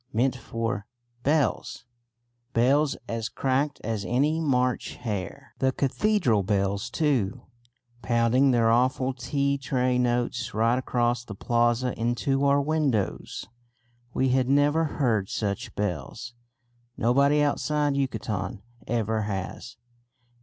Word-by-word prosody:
meant 125 Hz, +4 st, +1 dB
for 115 Hz, -3 st, -4 dB, 0.3 s
bells; 145 Hz, -3 st, 0 dB, 0.7 s
bells 135 Hz, +5 st, +3 dB
as 115 Hz, -1 st, -3 dB
cracked 140 Hz, +2 st, 0 dB
as 110 Hz, -2 st, -2 dB
any 140 Hz, -, +1 dB
March 125 Hz, -5 st, 0 dB
hare; 105 Hz, -7 st, -5 dB
the 130 Hz, 0 st, +2 dB
cathedral 140 Hz, -, +1 dB
bells 100 Hz, +2 st, 0 dB
too, 130 Hz, -, 0 dB, 0.6 s
pounding 120 Hz, +3 st, +3 dB
their 115 Hz, -3 st, +3 dB
awful 130 Hz, +2 st, +2 dB
tea 140 Hz, +3 st, -1 dB
tray 125 Hz, -1 st, 0 dB
notes 120 Hz, 0 st, -1 dB
right 115 Hz, +3 st, +2 dB
across 120 Hz, -1 st, 0 dB
the 105 Hz, -4 st, -8 dB
plaza 120 Hz, +3 st, +1 dB
into 120 Hz, +4 st, 0 dB
our 140 Hz, 0 st, +4 dB
windows. 140 Hz, -, -1 dB, 0.7 s
We 130 Hz, +1 st, +1 dB
had 130 Hz, 0 st, +2 dB
never 145 Hz, +3 st, +3 dB
heard 115 Hz, -10 st, 0 dB
such 100 Hz, -2 st, -3 dB
bells; 105 Hz, -, -4 dB, 0.6 s
nobody 140 Hz, +5 st, +3 dB
outside 145 Hz, 0 st, +1 dB
Yucatan 105 Hz, -8 st, -3 dB, 0.2 s
ever 110 Hz, -1 st, 0 dB
has. 105 Hz, +5 st, -5 dB
125 Hz, 110 wpm, -26 LUFS, 115-140 Hz, 0.7 s, our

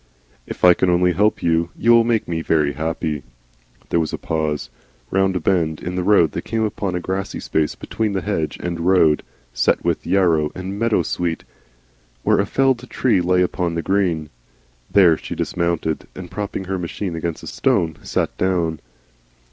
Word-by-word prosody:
"If -, -, -1 dB
I 90 Hz, -, +9 dB
can 95 Hz, -, +1 dB
only 90 Hz, 0 st, +3 dB
help 105 Hz, +3 st, +1 dB
you 85 Hz, 0 st, +2 dB
you 120 Hz, -, +3 dB
will 115 Hz, 0 st, +7 dB
make 115 Hz, -2 st, 0 dB
me 80 Hz, -1 st, -2 dB
very 75 Hz, -3 st, +1 dB
happy 80 Hz, -1 st, -2 dB, 0.4 s
" -, -, -33 dB
There 85 Hz, -, +2 dB
was 80 Hz, -2 st, -1 dB
a -, -, -3 dB
pause. 75 Hz, -6 st, -2 dB, 0.4 s
Round 95 Hz, 0 st, +2 dB
a -, -, +1 dB
bend 80 Hz, -3 st, 0 dB
in 90 Hz, -, -5 dB
the 90 Hz, -, -1 dB
road 90 Hz, -5 st, +4 dB
they -, -, -4 dB
came 110 Hz, -1 st, -2 dB
upon 100 Hz, -3 st, -2 dB
a -, -, 0 dB
grassy 95 Hz, +2 st, -3 dB
space 75 Hz, -1 st, -1 dB
between 110 Hz, -3 st, -3 dB
hedge 95 Hz, -5 st, -2 dB
and 85 Hz, -1 st, -3 dB
road, 85 Hz, -3 st, +4 dB, 0.3 s
set -, -, +1 dB
with -, -, -1 dB
yarrow 85 Hz, -6 st, +2 dB
and 95 Hz, +2 st, -5 dB
meadowsweet, 90 Hz, -7 st, 0 dB, 0.8 s
where -, -, +3 dB
a 100 Hz, -, +1 dB
felled 130 Hz, -1 st, +1 dB
tree 120 Hz, -8 st, +2 dB
lay 90 Hz, +1 st, +3 dB
among 90 Hz, -1 st, -1 dB
the 85 Hz, -, -2 dB
green. 90 Hz, -6 st, 0 dB, 0.6 s
There 90 Hz, -5 st, +5 dB
she -, -, -7 dB
dismounted, 85 Hz, -2 st, -1 dB
and 90 Hz, -2 st, -9 dB
propping 100 Hz, -2 st, -4 dB
her 95 Hz, 0 st, -3 dB
machine 90 Hz, +1 st, -4 dB
against 80 Hz, 0 st, -4 dB
a -, -, -8 dB
stone, 80 Hz, -3 st, 0 dB
sat -, -, -2 dB
down. 85 Hz, -4 st, 0 dB
90 Hz, 180 wpm, -21 LUFS, 80-95 Hz, 0.8 s, I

